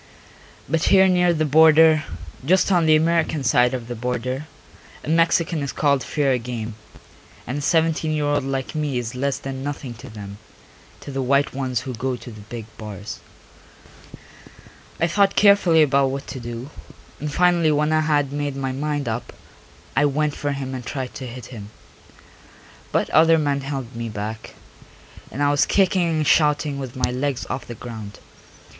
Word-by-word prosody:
But 160 Hz, +3 st, 0 dB
here 190 Hz, -1 st, +6 dB
near 180 Hz, -1 st, +3 dB
the 155 Hz, -2 st, 0 dB
border, 160 Hz, +1 st, +6 dB, 0.4 s
just 185 Hz, +7 st, +3 dB
on 175 Hz, -3 st, +3 dB
the 155 Hz, -, +6 dB
American 160 Hz, -2 st, +1 dB
side 125 Hz, 0 st, +3 dB
of 120 Hz, -2 st, -6 dB
the 120 Hz, -, -4 dB
border, 125 Hz, +4 st, -3 dB, 0.6 s
a -, -, -6 dB
Mexican 165 Hz, 0 st, +2 dB
is 140 Hz, -2 st, -3 dB
called 140 Hz, -3 st, +1 dB
fair 135 Hz, -4 st, 0 dB
game, 115 Hz, -2 st, -5 dB, 0.7 s
and 135 Hz, +4 st, -3 dB
a -, -, -5 dB
seventeen 160 Hz, 0 st, +1 dB
year 150 Hz, -1 st, 0 dB
old 145 Hz, -1 st, +1 dB
like 135 Hz, -1 st, -3 dB
me 150 Hz, -4 st, -1 dB
is 120 Hz, -2 st, -4 dB
less 135 Hz, +2 st, -1 dB
than 135 Hz, -1 st, -6 dB
nothing 140 Hz, -3 st, -5 dB
to 135 Hz, -, -10 dB
them, 100 Hz, -2 st, -9 dB, 0.6 s
to -, -, -8 dB
the 135 Hz, 0 st, -2 dB
white 140 Hz, +2 st, +2 dB
ones 130 Hz, -3 st, -2 dB
who 130 Hz, -1 st, -6 dB
go 125 Hz, +3 st, -2 dB
to 120 Hz, 0 st, -10 dB
the 110 Hz, -1 st, -11 dB
big 110 Hz, +1 st, -8 dB
bars. 105 Hz, 0 st, -7 dB, 1.8 s
I 165 Hz, -, +3 dB
thought 195 Hz, +3 st, +2 dB
carefully 200 Hz, -6 st, +5 dB
about 140 Hz, -2 st, +2 dB
what 135 Hz, +1 st, -4 dB
to 130 Hz, -, -6 dB
do, 120 Hz, +3 st, -7 dB, 0.5 s
and 150 Hz, 0 st, -4 dB
finally 175 Hz, -1 st, +3 dB
when 150 Hz, +1 st, +1 dB
I 155 Hz, -, +3 dB
had 145 Hz, -3 st, +1 dB
made 145 Hz, -1 st, -2 dB
my 135 Hz, -1 st, -2 dB
mind 145 Hz, +1 st, -2 dB
up 115 Hz, +1 st, -3 dB, 0.6 s
I 145 Hz, -, +4 dB
went 150 Hz, +1 st, 0 dB
for 145 Hz, -1 st, -2 dB
him 135 Hz, -1 st, -5 dB
and 130 Hz, -1 st, -5 dB
tried 130 Hz, 0 st, -5 dB
to 130 Hz, -, -7 dB
hit 120 Hz, -1 st, -9 dB
him. 105 Hz, -3 st, -9 dB, 1.2 s
But -, -, 0 dB
other 165 Hz, +1 st, +6 dB
men 145 Hz, -2 st, 0 dB
held 135 Hz, -3 st, -5 dB
me 115 Hz, 0 st, -4 dB
back, 110 Hz, +1 st, -6 dB, 0.7 s
and 140 Hz, +5 st, -3 dB
I 145 Hz, -, +3 dB
was 145 Hz, 0 st, +2 dB
kicking 185 Hz, -3 st, +2 dB
and 155 Hz, -2 st, 0 dB
shouting 150 Hz, -1 st, +2 dB
with 130 Hz, -3 st, -6 dB
my 125 Hz, -1 st, 0 dB
legs 130 Hz, 0 st, -2 dB
off 130 Hz, -, -4 dB
the 120 Hz, -, -7 dB
ground. 110 Hz, -3 st, -8 dB
140 Hz, 175 wpm, -22 LUFS, 125-155 Hz, 1.8 s, here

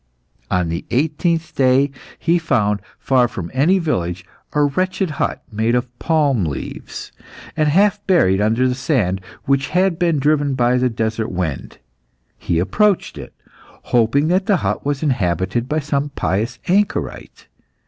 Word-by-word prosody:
On 90 Hz, -2 st, 0 dB
the 85 Hz, +1 st, -3 dB
eighteenth 160 Hz, +4 st, 0 dB
day, 135 Hz, +1 st, +3 dB, 0.3 s
he 175 Hz, +1 st, +2 dB
found, 105 Hz, -10 st, +1 dB, 0.2 s
far 130 Hz, -2 st, +2 dB
from 90 Hz, -7 st, -7 dB
any 155 Hz, +9 st, +3 dB
village, 90 Hz, -, -2 dB, 0.3 s
a 150 Hz, -, +3 dB
wretched 185 Hz, +4 st, 0 dB
hut -, -, -1 dB
made 110 Hz, +3 st, +1 dB
of 125 Hz, 0 st, -2 dB
palm 145 Hz, -, +2 dB
leaves, 75 Hz, -4 st, -6 dB, 0.4 s
and 155 Hz, -1 st, +2 dB
half 205 Hz, +5 st, +3 dB
buried 100 Hz, -, +3 dB
under 115 Hz, +4 st, +2 dB
the 125 Hz, -, 0 dB
sand 125 Hz, -, 0 dB, 0.2 s
which 140 Hz, +1 st, +1 dB
had 180 Hz, -2 st, +1 dB
been 170 Hz, -3 st, +2 dB
driven 145 Hz, -1 st, +1 dB
by 125 Hz, 0 st, +2 dB
the 125 Hz, 0 st, +2 dB
desert 110 Hz, -1 st, -2 dB
wind. 90 Hz, -7 st, -4 dB, 0.6 s
He 85 Hz, -, -1 dB
approached 195 Hz, -, +1 dB
it, -, -, -10 dB, 0.6 s
hoping 125 Hz, +5 st, +3 dB
that 185 Hz, +2 st, +1 dB
the 200 Hz, -, +4 dB
hut -, -, -1 dB
was 145 Hz, +1 st, -2 dB
inhabited 105 Hz, -, 0 dB
by 155 Hz, +1 st, 0 dB
some 145 Hz, 0 st, -1 dB
pious 115 Hz, -2 st, -2 dB
anchorite. 200 Hz, +3 st, -1 dB
135 Hz, 150 wpm, -19 LUFS, 110-160 Hz, 0.6 s, the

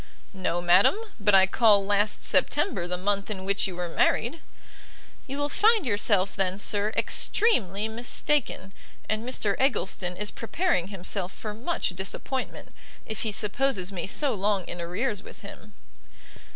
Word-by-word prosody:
"No, 180 Hz, -2 st, -2 dB
madam; 180 Hz, -, +5 dB, 0.2 s
but 205 Hz, -1 st, +4 dB
I 190 Hz, 0 st, +7 dB
call 205 Hz, 0 st, +4 dB
last 205 Hz, +1 st, +1 dB
September 175 Hz, -, +1 dB
the 180 Hz, 0 st, -2 dB
month 200 Hz, +2 st, -1 dB
in 190 Hz, -3 st, -4 dB
which 200 Hz, 0 st, +1 dB
you 185 Hz, -, -7 dB
were 175 Hz, 0 st, -3 dB
married." 235 Hz, -, 0 dB, 0.9 s
"You 275 Hz, +1 st, -5 dB
will 290 Hz, 0 st, -1 dB
find 430 Hz, +4 st, +3 dB
yourself, 205 Hz, -3 st, +2 dB
then, 190 Hz, -1 st, -1 dB
sir, 205 Hz, +1 st, 0 dB
extremely 215 Hz, -, +1 dB
mistaken; 235 Hz, -2 st, -2 dB, 0.3 s
and 215 Hz, +1 st, -2 dB
Mr 220 Hz, -5 st, 0 dB
Eggleston 190 Hz, -8 st, 0 dB
is 210 Hz, +1 st, -2 dB
preparing 235 Hz, -, -1 dB
himself 190 Hz, -1 st, -3 dB
for 210 Hz, +1 st, -7 dB
much 255 Hz, +11 st, -2 dB
disappointment, 195 Hz, +8 st, -4 dB, 0.4 s
if 220 Hz, -2 st, -5 dB
he 220 Hz, -, -1 dB
supposes 205 Hz, -1 st, 0 dB
me 190 Hz, -2 st, -4 dB
so 275 Hz, +5 st, +1 dB
long 200 Hz, -2 st, 0 dB
in 175 Hz, -, -6 dB
arrears 195 Hz, +5 st, -2 dB
with -, -, -13 dB
him." 210 Hz, +1 st, -12 dB
205 Hz, 150 wpm, -26 LUFS, 190-235 Hz, 0.9 s, I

